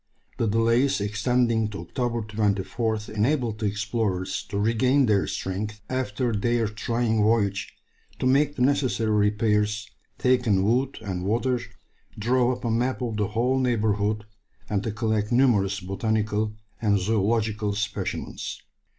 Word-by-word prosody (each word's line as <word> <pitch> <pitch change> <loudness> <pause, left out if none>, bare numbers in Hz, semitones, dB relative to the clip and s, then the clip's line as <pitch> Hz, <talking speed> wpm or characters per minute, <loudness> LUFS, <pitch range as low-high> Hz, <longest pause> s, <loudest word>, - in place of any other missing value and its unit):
The 115 - +2
delays 115 +5 +2
extending 110 +2 +1
to 100 -4 -6
October 115 +6 -2
24th 110 +1 -1
enabled 115 0 0
the 110 - 0
explorers 100 -2 -1
to 100 - -3
regain 125 +6 +3
their 105 -4 +2
strength, 105 +3 -4
after 125 -2 -1
their 115 +2 +1
trying 110 +1 0
voyage, 105 -2 +1 0.5
to - - -3
make 145 +3 +3
the 125 - +1
necessary 130 -5 +1
repairs, 105 0 +1 0.3
take 125 -1 +2
in 95 -3 +3
wood 125 +6 +1
and 95 -4 -4
water, 120 +5 +1 0.6
draw 120 +3 +2
up 125 -1 -5
a 115 - +1
map 125 +3 0
of 115 -3 -2
the 105 -2 +1
whole 120 +6 +1
neighbourhood, 105 -4 0 0.4
and 100 -2 0
to 110 - -3
collect 110 -1 -1
numerous 105 -7 +3
botanical 105 +2 -1 0.3
and 105 -2 +3
zoological 105 +1 0
specimens. 105 0 -4
110 Hz, 135 wpm, -25 LUFS, 105-120 Hz, 0.6 s, regain